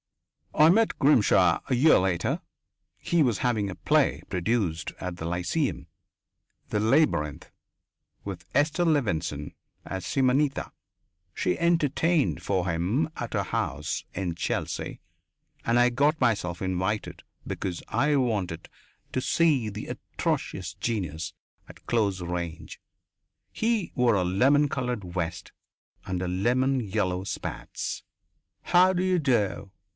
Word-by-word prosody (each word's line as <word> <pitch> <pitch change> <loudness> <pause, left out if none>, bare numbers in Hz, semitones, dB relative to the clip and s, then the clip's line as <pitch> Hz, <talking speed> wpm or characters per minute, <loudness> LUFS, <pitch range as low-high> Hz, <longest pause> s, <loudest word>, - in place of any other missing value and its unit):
I 155 +1 +6
met 220 +5 +3
Grimshaw 135 -7 +4
a - - +3
year 150 +6 +6
later. 90 -2 0 0.6
He 170 -2 +2
was 120 -6 +1
having 115 -6 0
a 95 - -6
play - - +2
produced 90 -4 -1
at 90 -1 -4
the 80 - -5
Lyceum 90 - -1 0.8
"The 105 - 0
Labyrinth" 110 - +1 0.7
with 95 -3 -6
Esther 150 +5 +2
Levenson 90 - 0 0.3
as 95 -1 -5
Simonetta. 135 +1 +1 0.6
She 90 - 0
entertained 165 -2 +2
for 95 -2 0
him 90 - 0
at 120 - -5
her 100 -2 +1
house 75 -4 -2
in 90 -3 -3
Chelsea - - -3 0.6
and 120 +1 +2
I 120 0 +5
got 145 +6 +2
myself 100 -8 0
invited 95 +3 -2 0.2
because 90 -3 -4
I 145 +6 +2
wanted 100 -10 -1 0.5
to 130 - 0
see 145 -7 +2
the 105 +1 -7
atrocious - - -3
genius 85 -9 -3 0.4
at - - -15
close 100 -5 +1
range. 85 -2 -5 0.7
He 225 -4 0
wore 125 -4 +3
a 95 - +2
lemon 130 +11 +3
coloured 125 -5 -2
vest 90 0 -3 0.5
and 90 0 -2
lemon 130 +2 +2
yellow 95 -4 -1
spats. - - -5 0.6
"How 185 +1 +5
d'you 185 0 +1
do?" 105 - 0
110 Hz, 120 wpm, -27 LUFS, 90-140 Hz, 0.8 s, I